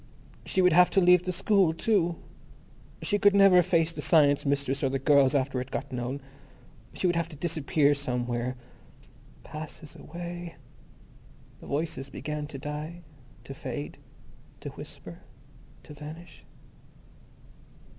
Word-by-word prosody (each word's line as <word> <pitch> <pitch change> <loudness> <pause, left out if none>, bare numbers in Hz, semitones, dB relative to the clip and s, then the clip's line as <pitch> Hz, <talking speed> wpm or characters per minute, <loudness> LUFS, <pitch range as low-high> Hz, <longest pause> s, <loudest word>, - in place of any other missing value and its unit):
_ - - -15
She 190 - +1
would 180 -2 +5
have 180 +2 +6
to - - +9
leave 180 -1 +5
the 185 - -1
school, 190 -2 +2
too. 175 -3 +1 0.9
She 205 - +1
could 205 0 +5
never 195 -2 +7
face 170 -2 +2
the - - -6
Science 145 -3 +4
Mistress 140 0 0
or 135 - +2
the 135 - -1
girls 140 -1 +4
after 130 -1 0
it 130 - -7
got - - -5
known. 125 +3 -4 0.7
She - - -2
would 175 -1 +2
have 170 -1 0
to 155 - -10
disappear 150 -2 +1
somewhere. 125 -2 -2 0.9
Passes 155 0 -9
away. 175 +1 -8 1.0
The - - -13
voices 145 -2 -3
began 150 +1 -5
to 145 - -8
die, 150 +5 -6 0.4
to 135 - -8
fade, 135 +1 -6 0.6
to - - -5
whisper... - - -10 0.6
to - - -12
vanish.... 155 +4 -11
155 Hz, 140 wpm, -28 LUFS, 140-175 Hz, 1.0 s, to